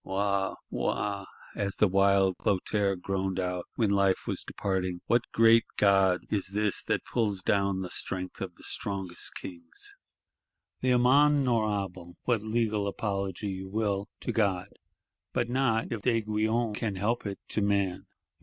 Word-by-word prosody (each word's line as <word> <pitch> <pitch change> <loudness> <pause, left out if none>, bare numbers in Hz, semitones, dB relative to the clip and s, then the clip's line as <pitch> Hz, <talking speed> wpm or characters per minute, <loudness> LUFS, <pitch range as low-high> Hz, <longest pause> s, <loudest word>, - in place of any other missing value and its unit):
—'Wa, 100 0 0 0.2
Wa,' 100 -2 -1 0.3
as 100 -2 -2
the 105 - +4
wild 95 0 +4
Clotaire 100 0 +1
groaned 95 +1 -2
out, 90 -1 -2
when 110 -4 +2
life 100 -1 +2
was - - -3
departing, 95 -2 -2
'what 120 0 +1
great 115 0 +6
God 95 -2 +4
is 100 -3 0
this 105 -1 +1
that - - -1
pulls 105 -5 -1
down 100 -1 +1
the 90 - -4
strength 90 -1 -3
of 90 -3 -5
the - - -18
strongest 95 -3 -4
kings!' 85 -3 -8 0.9
The 130 - +1
amende 135 +3 +5
honorable, 100 -7 -1
what 120 -4 +1
"legal 110 -2 0
apology" 100 -1 -2
you 95 0 -5
will, 100 -1 -1
to - - -2
God:—but 100 +3 -3
not, 125 -4 +1
if 115 -3 -3
D'Aiguillon 110 0 +1
can 105 -1 -2
help 105 +4 -1
it, 100 - -4
to 105 - 0
man. 100 -2 0
100 Hz, 145 wpm, -29 LUFS, 95-110 Hz, 0.9 s, great